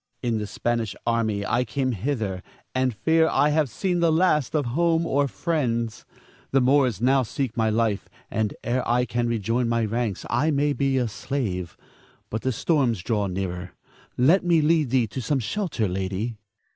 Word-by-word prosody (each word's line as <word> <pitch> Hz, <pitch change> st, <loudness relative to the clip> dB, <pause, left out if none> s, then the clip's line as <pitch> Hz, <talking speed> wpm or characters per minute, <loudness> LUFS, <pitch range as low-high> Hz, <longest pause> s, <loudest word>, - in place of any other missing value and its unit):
In 115 Hz, -3 st, 0 dB
the 105 Hz, -, -4 dB
Spanish 115 Hz, -1 st, -2 dB
army 110 Hz, -3 st, 0 dB
I 120 Hz, +1 st, +1 dB
came 130 Hz, +2 st, -1 dB
hither, 105 Hz, -5 st, -2 dB, 0.3 s
and 130 Hz, 0 st, +1 dB
fear 160 Hz, +9 st, +2 dB
I 145 Hz, -, +3 dB
have 150 Hz, -2 st, +2 dB
seen 180 Hz, -, -1 dB
the 170 Hz, -1 st, +3 dB
last 160 Hz, -4 st, +2 dB
of 145 Hz, -3 st, +1 dB
home 165 Hz, +6 st, +1 dB
or 140 Hz, -2 st, +1 dB
friends. 120 Hz, -9 st, -2 dB, 0.4 s
The 135 Hz, -, +3 dB
Moors 130 Hz, -5 st, +3 dB
now 135 Hz, +2 st, +4 dB
seek 125 Hz, 0 st, -3 dB
my 110 Hz, -1 st, +2 dB
life, 110 Hz, -2 st, 0 dB, 0.2 s
and 110 Hz, -2 st, -1 dB
ere 125 Hz, +2 st, 0 dB
I 125 Hz, +1 st, +3 dB
can 120 Hz, -1 st, -1 dB
rejoin 115 Hz, +2 st, 0 dB
my 115 Hz, -1 st, +1 dB
ranks, 110 Hz, -2 st, -2 dB
I 140 Hz, +7 st, +1 dB
may 145 Hz, -1 st, +2 dB
be 135 Hz, -1 st, +1 dB
a 125 Hz, -2 st, +1 dB
slave. 105 Hz, -7 st, -3 dB, 0.5 s
But 110 Hz, -, -2 dB
the 130 Hz, -, 0 dB
storm 130 Hz, 0 st, +1 dB
draws 105 Hz, 0 st, -1 dB
nearer. 90 Hz, -1 st, -4 dB, 0.4 s
Let 160 Hz, +11 st, +4 dB
me 170 Hz, -2 st, +3 dB
lead 155 Hz, -2 st, +2 dB
thee 125 Hz, -1 st, +3 dB
to 120 Hz, +5 st, -6 dB
some 140 Hz, +4 st, 0 dB
shelter, 130 Hz, -, -1 dB
lady. 95 Hz, +5 st, -3 dB
120 Hz, 175 wpm, -24 LUFS, 110-145 Hz, 0.5 s, now